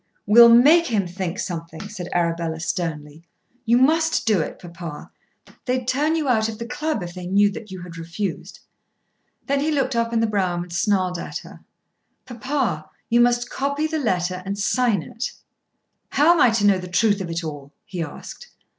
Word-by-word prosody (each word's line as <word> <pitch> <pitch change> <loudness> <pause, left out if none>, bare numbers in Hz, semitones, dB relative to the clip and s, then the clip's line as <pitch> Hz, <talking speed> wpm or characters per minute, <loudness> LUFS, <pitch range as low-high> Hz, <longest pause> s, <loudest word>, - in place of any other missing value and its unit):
"We'll 235 +3 +8
make 295 +9 +6
him 210 -5 0
think 180 0 -4
something," 170 -3 -5
said 185 -4 -7
Arabella 170 -2 -1
sternly. 160 -3 -4 0.4
"You 235 +1 +4
must 320 +5 +2
do 215 -4 +3
it, - - -5
papa. 170 -3 -9 0.5
They'd 250 -1 -1
turn 295 +5 +1
you 310 -3 -1
out 220 -3 +2
of 220 - -7
the 235 - -6
club 250 - -2
if 175 0 -7
they 180 -1 -7
knew 200 +2 +3
that 215 +1 -9
you 185 -2 -8
had 170 -2 -10
refused." 170 +5 -5 0.8
Then 280 0 0
he 295 +3 0
looked 270 -4 0
up 230 0 0
in 230 - +1
the 225 - +2
brougham 185 -5 -1
and 175 -1 -11
snarled 185 -2 0
at - - -5
her. - - -13 0.7
"Papa, 235 - -2 0.2
you 240 +1 +5
must 240 0 +2
copy 280 +3 -1
the 315 0 -1
letter 185 -7 -1
and 195 +2 -4
sign 215 -2 +1
it." 235 +3 -5 0.8
"How 295 +5 +4
am 335 - +1
I - - +7
to 220 -2 +1
know 200 -2 +4
the 180 - -7
truth 205 +2 +2
of 180 - -5
it 165 +1 -3
all?" 145 -3 -7
he 180 -3 -5
asked. 485 - -8
205 Hz, 190 wpm, -22 LUFS, 175-250 Hz, 0.8 s, We'll